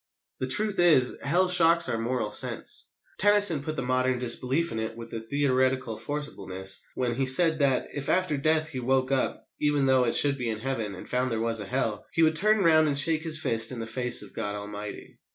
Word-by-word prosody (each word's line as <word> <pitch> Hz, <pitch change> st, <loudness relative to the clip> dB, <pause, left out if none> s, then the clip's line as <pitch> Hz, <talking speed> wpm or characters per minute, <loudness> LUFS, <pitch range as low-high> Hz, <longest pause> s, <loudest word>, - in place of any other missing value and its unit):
The 130 Hz, -, -3 dB
truth 210 Hz, +7 st, 0 dB
is, 155 Hz, -8 st, +3 dB
Hell 175 Hz, +6 st, +1 dB
shocks 170 Hz, -1 st, +4 dB
our 115 Hz, -, -3 dB
moral 115 Hz, -2 st, -3 dB
sense. -, -, +2 dB, 0.3 s
Tennyson 205 Hz, -6 st, +6 dB
put 155 Hz, +2 st, -6 dB
the 135 Hz, -, -4 dB
modern 130 Hz, 0 st, 0 dB
disbelief 125 Hz, +6 st, +1 dB
in 110 Hz, -, -4 dB
it 110 Hz, +1 st, -5 dB
with 115 Hz, 0 st, -10 dB
a 115 Hz, -, -4 dB
theatrical 130 Hz, -1 st, -1 dB
forcibleness 95 Hz, -10 st, -5 dB, 0.2 s
when 125 Hz, -2 st, -2 dB
he 135 Hz, +2 st, -2 dB
said 160 Hz, +4 st, +3 dB
that, 135 Hz, -3 st, 0 dB
if 140 Hz, -1 st, -5 dB
after 185 Hz, -4 st, 0 dB
death 155 Hz, +2 st, 0 dB
he 135 Hz, -5 st, -6 dB
woke 130 Hz, +1 st, -1 dB
up, 135 Hz, -1 st, -2 dB
even 145 Hz, -2 st, 0 dB
though 130 Hz, -1 st, +2 dB
it 115 Hz, -, 0 dB
should 140 Hz, -2 st, +1 dB
be 120 Hz, -2 st, -3 dB
in 110 Hz, -, -3 dB
Heaven, 110 Hz, -4 st, -4 dB
and 90 Hz, -, -11 dB
found 125 Hz, 0 st, -2 dB
there 115 Hz, -, -2 dB
was 115 Hz, 0 st, 0 dB
a 105 Hz, -, -6 dB
Hell, 110 Hz, -4 st, -3 dB
he 165 Hz, -, +2 dB
would 160 Hz, 0 st, +2 dB
turn 215 Hz, +4 st, +2 dB
round 155 Hz, -2 st, +4 dB
and 140 Hz, -2 st, 0 dB
shake 155 Hz, +2 st, +4 dB
his 160 Hz, -2 st, -2 dB
fist 115 Hz, -5 st, 0 dB
in 125 Hz, -, -6 dB
the 115 Hz, -, -5 dB
face 125 Hz, 0 st, +1 dB
of 100 Hz, -, -13 dB
God 105 Hz, 0 st, -4 dB
Almighty. 105 Hz, 0 st, -9 dB
130 Hz, 220 wpm, -26 LUFS, 115-155 Hz, 0.3 s, Tennyson